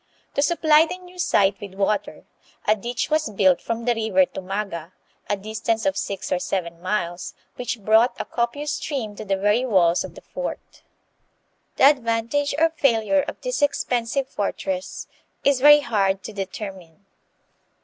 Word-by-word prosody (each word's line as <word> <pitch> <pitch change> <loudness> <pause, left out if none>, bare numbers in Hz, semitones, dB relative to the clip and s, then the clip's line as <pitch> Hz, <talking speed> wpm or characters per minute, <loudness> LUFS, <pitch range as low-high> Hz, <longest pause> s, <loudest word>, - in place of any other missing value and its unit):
To - - +1
supply 315 0 +4
the 360 - -5
new 360 0 -15
site 200 - +2
with 200 -2 -8
water, 200 +1 -1 0.4
a 215 - +5
ditch 240 +7 -3
was 310 -3 +1
built 190 -4 +3
from 230 0 -3
the 245 - +3
river 220 -5 +2
Tumaga, 185 -3 -5 0.4
a 205 - +1
distance 220 +2 -2
of 290 - +1
six 200 - -4
or 180 - +2
seven 170 -3 -3
miles, 180 -2 -3 0.2
which 245 -1 -4
brought 220 +4 +3
a - - -3
copious 265 +6 -2
stream 260 -9 -3
to 215 - -7
the 195 -2 0
very 210 +5 +2
walls 180 -8 +3
of - - -9
the - - -11
fort. - - -7 0.9
The - - 0
advantage 265 +1 +3
or 325 +1 +3
failure 275 -3 +2
of - - -6
this - - -2
.expensive 265 -2 0
fortress 190 -4 -3 0.4
is 275 -2 +3
very 295 +1 +8
hard 195 -6 0
to 220 - -7
determine. 195 -2 -7
220 Hz, 160 wpm, -23 LUFS, 195-280 Hz, 0.9 s, very